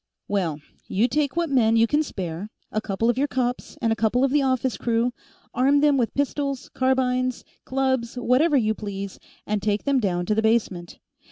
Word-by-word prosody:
"Well, 175 Hz, -7 st, -1 dB, 0.3 s
you 215 Hz, +6 st, +2 dB
take 280 Hz, +2 st, 0 dB
what 340 Hz, -3 st, 0 dB
men 230 Hz, -4 st, +4 dB
you 225 Hz, 0 st, +5 dB
can 295 Hz, +6 st, +1 dB
spare 185 Hz, -, -5 dB, 0.2 s
a 215 Hz, -, -1 dB
couple 215 Hz, +2 st, -1 dB
of 240 Hz, +1 st, +2 dB
your 285 Hz, -, +2 dB
cops, 250 Hz, -2 st, -2 dB
and 225 Hz, -1 st, +3 dB
a -, -, -3 dB
couple 225 Hz, +4 st, +1 dB
of 270 Hz, -, +2 dB
the 295 Hz, +1 st, +3 dB
office 260 Hz, -2 st, 0 dB
crew 235 Hz, +1 st, 0 dB, 0.4 s
arm 275 Hz, +3 st, +3 dB
them 295 Hz, -1 st, +4 dB
with 240 Hz, -4 st, 0 dB
pistols, 280 Hz, -1 st, -2 dB
carbines, 255 Hz, -1 st, 0 dB, 0.2 s
clubs, 260 Hz, -3 st, -1 dB
whatever 260 Hz, +5 st, +3 dB
you 220 Hz, -3 st, +2 dB
please, 200 Hz, -2 st, -6 dB, 0.3 s
and 210 Hz, -1 st, -1 dB
take 205 Hz, 0 st, 0 dB
them 280 Hz, -2 st, +2 dB
down 175 Hz, -5 st, -1 dB
to 215 Hz, -, +1 dB
the 220 Hz, -, +1 dB
basement. 210 Hz, -6 st, 0 dB
245 Hz, 190 wpm, -24 LUFS, 215-265 Hz, 0.4 s, you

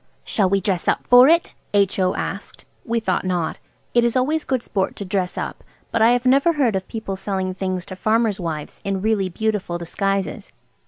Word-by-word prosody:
"Shall 195 Hz, -4 st, +1 dB
we 195 Hz, +1 st, +2 dB
dress 185 Hz, -2 st, -2 dB
up -, -, +1 dB
for 245 Hz, +1 st, +8 dB
it?" 335 Hz, +2 st, +3 dB, 0.2 s
H.O. 195 Hz, -2 st, +2 dB
asked. -, -, -5 dB, 0.2 s
We 230 Hz, 0 st, 0 dB
thought 190 Hz, -5 st, -1 dB
not. 180 Hz, -3 st, -2 dB, 0.3 s
It 240 Hz, -, +4 dB
is 235 Hz, +1 st, +1 dB
always 295 Hz, +5 st, +1 dB
good 260 Hz, -3 st, -1 dB
sport 190 Hz, -2 st, -2 dB
to 200 Hz, -, -6 dB
dress 185 Hz, -1 st, -2 dB
up, -, -, -5 dB, 0.3 s
but 230 Hz, -, 0 dB
I 225 Hz, -, +7 dB
have 245 Hz, +1 st, +2 dB
never 275 Hz, +6 st, +4 dB
heard 260 Hz, -9 st, +1 dB
of 190 Hz, -1 st, -3 dB
people 220 Hz, -4 st, -5 dB
selling 190 Hz, -1 st, -2 dB
things 185 Hz, -1 st, -3 dB
to 185 Hz, -, -8 dB
farmers' 220 Hz, +1 st, +1 dB
wives 160 Hz, -4 st, -5 dB
in 195 Hz, -1 st, -2 dB
really 210 Hz, -4 st, +1 dB
beautiful 205 Hz, -2 st, -2 dB
disguises. 195 Hz, +3 st, -2 dB
200 Hz, 195 wpm, -21 LUFS, 185-235 Hz, 0.3 s, for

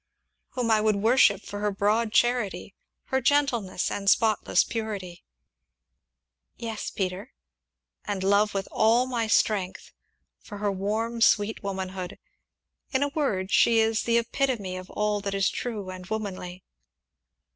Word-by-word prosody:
"Whom 240 Hz, -3 st, 0 dB
I 215 Hz, -1 st, +4 dB
would 215 Hz, -1 st, +2 dB
worship 215 Hz, -1 st, +4 dB
for 205 Hz, -, -7 dB
her 210 Hz, 0 st, 0 dB
broad 210 Hz, +3 st, +1 dB
charity, 240 Hz, -5 st, +1 dB, 0.4 s
her 265 Hz, 0 st, +1 dB
gentleness, 240 Hz, -12 st, +1 dB
and 200 Hz, -1 st, 0 dB
spotless 220 Hz, +1 st, +3 dB
purity." 205 Hz, -6 st, -5 dB, 1.3 s
"Yes, 225 Hz, -2 st, -5 dB
Peter." 190 Hz, +5 st, -4 dB, 0.7 s
"And 200 Hz, -2 st, -3 dB
love 200 Hz, +2 st, +2 dB
with 195 Hz, 0 st, -2 dB
all 230 Hz, +3 st, +3 dB
my 240 Hz, -3 st, -2 dB
strength, 200 Hz, -4 st, 0 dB, 0.5 s
for 205 Hz, -, -10 dB
her 205 Hz, 0 st, -1 dB
warm, 220 Hz, +4 st, -2 dB
sweet 215 Hz, -1 st, +3 dB
womanhood 190 Hz, -2 st, -5 dB, 0.7 s
in 265 Hz, 0 st, +1 dB
a 285 Hz, -, 0 dB
word, 205 Hz, -11 st, -1 dB
she 230 Hz, -, +4 dB
is 220 Hz, -1 st, +2 dB
the 235 Hz, 0 st, +2 dB
epitome 235 Hz, -5 st, -1 dB
of 185 Hz, 0 st, -8 dB
all 210 Hz, -1 st, -1 dB
that 200 Hz, 0 st, -3 dB
is 195 Hz, 0 st, +2 dB
true 210 Hz, -6 st, -5 dB
and 185 Hz, 0 st, -8 dB
womanly!" 190 Hz, -4 st, -5 dB
210 Hz, 135 wpm, -26 LUFS, 195-230 Hz, 1.3 s, I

